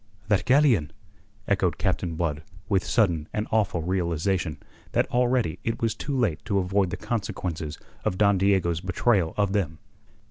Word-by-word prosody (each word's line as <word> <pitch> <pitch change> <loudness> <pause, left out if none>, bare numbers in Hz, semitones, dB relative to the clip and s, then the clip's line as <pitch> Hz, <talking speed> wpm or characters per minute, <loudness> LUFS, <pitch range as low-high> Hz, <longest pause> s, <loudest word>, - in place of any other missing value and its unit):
"That 100 -3 +2
galleon!" 130 - +4 0.6
echoed - - +1
Captain 85 -2 -1
Blood 80 -3 -1 0.3
with 95 -3 +2
sudden 85 -9 +1
and 105 - -1
awful 100 -7 +1
realization 90 -1 -1 0.4
that - - +3
already 125 -8 +1
it 115 - -2
was 115 -2 +1
too 140 -1 -3
late 95 -12 0
to 105 -3 0
avoid 95 0 +1
the - - -4
consequences 85 -8 -3 0.3
of 90 - -1
Don 100 -1 +4
Diego's 90 -4 +2
betrayal 95 -2 +1
of 100 -1 +1
them. 85 -7 -1
95 Hz, 150 wpm, -26 LUFS, 85-110 Hz, 0.6 s, galleon